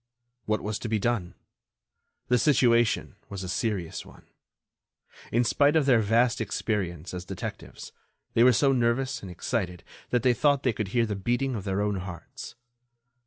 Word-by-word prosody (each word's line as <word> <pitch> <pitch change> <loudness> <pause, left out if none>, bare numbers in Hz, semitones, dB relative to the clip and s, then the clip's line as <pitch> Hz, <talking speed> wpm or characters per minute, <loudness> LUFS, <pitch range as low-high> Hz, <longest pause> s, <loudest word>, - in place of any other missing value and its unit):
What 110 0 0
was 105 0 -3
to 115 - -5
be 110 - +1
done? 105 -4 -1 0.9
The 125 0 +3
situation 120 -5 +3
was 100 -1 -6
a - - -5
serious 95 -3 -2
one. - - -17 1.1
In 120 +2 +3
spite 145 +5 +3
of 155 -3 +3
their 125 -4 +5
vast 115 +3 +2
experience 90 -7 -3
as 90 -1 -5
detectives, - - -7 0.4
they 115 - +5
were 125 - +7
so 135 +4 +3
nervous 130 +1 0
and 95 - -8
excited 90 -1 -3 0.3
that 125 -1 +1
they 125 -1 +4
thought 140 +3 +2
they 125 - +2
could 105 -1 -3
hear 115 +4 +1
the 105 -2 -3
beating 120 +7 -1
of 105 -4 -5
their 100 0 -1
own 105 -1 0
hearts. 90 -2 -8
115 Hz, 165 wpm, -27 LUFS, 100-125 Hz, 1.1 s, were